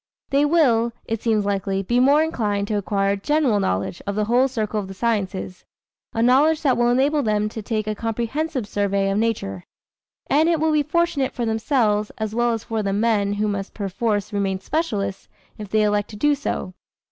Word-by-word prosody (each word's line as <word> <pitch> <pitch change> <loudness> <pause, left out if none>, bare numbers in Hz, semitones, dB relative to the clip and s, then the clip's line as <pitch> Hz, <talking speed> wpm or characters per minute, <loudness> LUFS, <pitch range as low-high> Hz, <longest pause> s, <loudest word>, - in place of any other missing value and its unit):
They 280 +1 +3
will, 245 -8 +3
it 225 -1 -3
seems 220 -3 +1
likely, 195 -1 -1
be 240 +6 +1
more 285 +4 +5
inclined 210 -10 -1
to - - -1
acquire 195 0 0
a - - +1
general 265 -1 +1
knowledge 95 - -2
of 200 - -2
the 210 0 0
whole 245 +4 +3
circle 220 -4 -2
of 200 - -5
the 195 - -9
sciences 190 -4 -2 0.5
a 225 - 0
knowledge 295 +6 +4
that 265 -4 +3
will 240 0 +2
enable 280 +5 +2
them 210 -3 +1
to 220 - -6
take 215 0 -2
a 215 - -1
comprehensive 235 +4 -2
survey 200 -1 0
of 200 - 0
nature. 150 - -2 0.6
And 310 +3 +3
it 335 -2 +2
will 315 +1 +2
be 305 -1 +3
fortunate 300 -2 0
for 240 - -1
themselves, 220 -2 +1
as 220 -1 -3
well 240 +1 +2
as 225 -1 -4
for 225 -1 -2
the 200 -1 -1
men 205 -1 +1
who 210 +1 0
must 200 -1 -4
perforce 205 +1 -2
remain 195 -2 -1
specialists, 205 - -2 0.3
if 210 -2 -7
they 215 +1 +2
elect 210 -1 +1
to 215 - -9
do 295 +8 +2
so. 265 -9 -3
220 Hz, 200 wpm, -22 LUFS, 200-260 Hz, 0.6 s, more